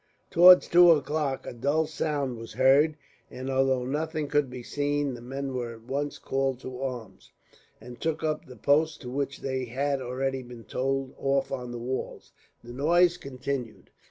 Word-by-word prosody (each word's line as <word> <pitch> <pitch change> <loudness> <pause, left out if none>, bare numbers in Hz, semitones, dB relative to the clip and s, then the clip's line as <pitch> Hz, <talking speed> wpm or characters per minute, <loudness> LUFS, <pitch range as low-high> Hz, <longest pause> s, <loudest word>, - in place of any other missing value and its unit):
Towards 180 +2 +8
two 175 0 +7
o'clock 150 -3 +1
a - - -6
dull 145 +7 +1
sound 150 -4 -2
was 115 -1 -9
heard 140 +6 +4 0.3
and, 130 +1 -5
although 130 -1 +2
nothing 155 +2 -2
could 145 -3 +1
be 125 -1 -8
seen, 145 0 -1
the 120 - -9
men 135 +2 -5
were 120 -2 -4
at 115 - -16
once 140 +4 -3
called 135 -2 -1
to 130 0 -7
arms, 120 -8 -6 0.5
and 120 +1 -12
took 160 -1 -2
up 155 -1 -1
the 125 - -11
posts 145 +7 +2
to 125 - -6
which 140 +1 -3
they 130 -1 -2
had 135 +3 -1
already 130 +1 -2
been 120 -2 -11
told 135 +2 -2
off 135 0 0
on 125 -2 -4
the 120 - -5
walls. 125 +3 -5 0.3
The 120 0 -10
noise 170 +6 +3
continued. 130 -3 -5
135 Hz, 175 wpm, -27 LUFS, 125-145 Hz, 0.5 s, Towards